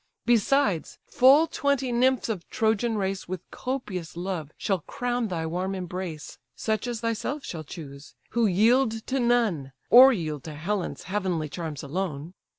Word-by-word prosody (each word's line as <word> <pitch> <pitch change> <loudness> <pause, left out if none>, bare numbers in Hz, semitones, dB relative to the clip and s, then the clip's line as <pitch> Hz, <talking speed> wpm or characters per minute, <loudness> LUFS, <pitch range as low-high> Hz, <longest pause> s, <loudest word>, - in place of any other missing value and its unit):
Besides, 235 - +2
full 275 +5 +6
twenty 280 -5 0
nymphs 255 +2 +2
of 205 -7 -4
Trojan 220 +1 +1
race 195 -1 -2
With 185 -1 -5
copious 200 -11 -4
love 175 -4 -3
shall 195 -3 0
crown 245 +4 -2
thy 170 -4 -3
warm 180 +4 -2
embrace; 180 -3 -6 0.2
Such 220 +1 -1
as 235 -3 -3
thyself 230 +5 -2
shall 160 -2 -5
chose; 140 -2 -10 0.2
who 235 -1 +2
yield 225 +4 +3
to 270 +1 -1
none, 225 - +1 0.2
Or 260 +3 +10
yield 155 - -3
to 155 -2 -7
Helen's 185 +5 -3
heavenly 185 -6 -2
charms 160 -3 -5
alone. 160 0 -4
195 Hz, 150 wpm, -26 LUFS, 170-240 Hz, 0.2 s, Or